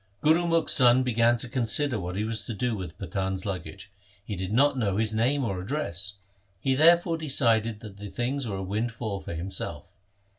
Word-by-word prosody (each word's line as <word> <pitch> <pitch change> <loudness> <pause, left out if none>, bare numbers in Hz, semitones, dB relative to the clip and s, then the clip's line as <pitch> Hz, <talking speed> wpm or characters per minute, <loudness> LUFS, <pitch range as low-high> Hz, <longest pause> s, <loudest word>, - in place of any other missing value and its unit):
Gurumukh's 165 +1 +3
son 125 0 +6
began 120 -1 +2
to 120 - -1
con 120 -1 -2
sider 125 +2 +2
what 90 -1 -5
he 105 - -1
was 110 -1 -2
to 115 - -4
do 120 +2 -1
with 90 -5 -7
the 95 - -6
Pathan' 95 -1 -2
s 95 - -5
luggage. 95 0 -6 0.3
He 105 - -4
did 95 +1 -4
not 140 +5 +3
know 100 -6 -1
his 110 0 0
name 130 +6 +1
or 95 -4 -3
address. 100 - -1 0.4
He 135 +6 +1
therefore 165 +3 +4
decided 115 -7 +1
that 105 -3 -10
the 105 0 -8
things 125 +3 -2
were 100 - -3
a 95 - -4
windfall 110 +1 -3
for 85 - -7
himself. 85 -1 -5
110 Hz, 200 wpm, -27 LUFS, 95-130 Hz, 0.4 s, son